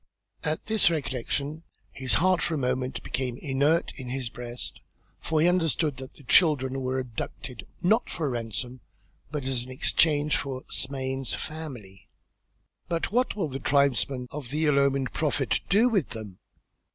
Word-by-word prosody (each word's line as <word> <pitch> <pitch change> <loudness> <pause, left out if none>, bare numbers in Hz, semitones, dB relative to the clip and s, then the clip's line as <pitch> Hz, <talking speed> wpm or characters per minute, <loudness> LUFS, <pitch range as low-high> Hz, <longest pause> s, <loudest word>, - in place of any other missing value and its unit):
At 155 +1 -1
this 215 -4 +4
recollection 145 0 -2 0.3
his 130 -2 +2
heart 185 +2 +3
for 165 - 0
a - - -1
moment 125 -1 -1
became 125 -2 -2
inert 145 +5 +1
in 130 -3 -6
his 130 -3 -3
breast 120 0 -5 0.4
for 160 -1 0
he 160 - +5
understood 165 -5 +2
that 130 0 -8
the 145 - -14
children 135 -3 +4
were 130 0 -1
abducted 125 -2 -5 0.2
not 215 +7 +3
for 165 - -3
a - - +1
ransom 120 +1 -4 0.5
but 150 -3 -4
as 130 -2 -1
an 130 - -11
exchange 145 +2 +3
for 135 -2 -3
Smain's 135 -1 -2
family. 130 -12 -7 0.8
"But 170 +1 -1
what 250 +3 +2
will 190 -6 0
the 135 0 -4
tribesmen 140 -2 +2
of 140 -4 -6
the 155 +3 0
ill 145 -2 +4
omened 135 -2 +1
prophet 145 -5 +1
do 215 +6 +5
with 200 - +1
them? 110 -6 -8
135 Hz, 160 wpm, -27 LUFS, 130-155 Hz, 0.8 s, he